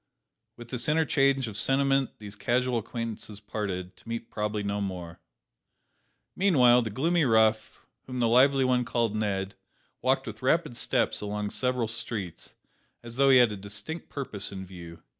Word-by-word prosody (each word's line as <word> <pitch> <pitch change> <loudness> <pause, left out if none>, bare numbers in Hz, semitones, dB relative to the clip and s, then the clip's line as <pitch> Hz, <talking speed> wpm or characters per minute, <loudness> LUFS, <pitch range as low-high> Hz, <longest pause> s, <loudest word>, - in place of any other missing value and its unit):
With 120 -1 -11
this 125 +1 -1
interchange 140 -4 +2
of 110 - -7
sentiment 135 +3 +1
these 105 -1 -9
casual 125 +3 0
acquaintances 115 -2 -6
parted, 100 -4 -4
to - - -15
meet 115 0 -5
probably 105 0 -2
no 100 0 -2
more! 90 -4 -5 1.2
Meanwhile 125 -11 +5
the 115 - -3
gloomy 165 - +1
rough, 110 -3 +2 0.2
whom 125 -1 -4
the 120 - +3
lively 130 +3 +5
one 125 -1 +3
had 125 - -3
called 115 -2 0
Ned, 100 -2 -1 0.5
walked - - +1
with - - -8
rapid - - +1
steps - - 0
along 105 0 -3
several 125 -2 0
streets, 115 -6 -5 0.5
as 120 0 -7
though 135 0 +5
he 130 - +8
had 120 -3 +5
a - - -4
distinct 105 - -6
purpose 110 -8 -5
in 95 -1 -6
view. 85 -3 -11
115 Hz, 160 wpm, -28 LUFS, 105-130 Hz, 1.2 s, he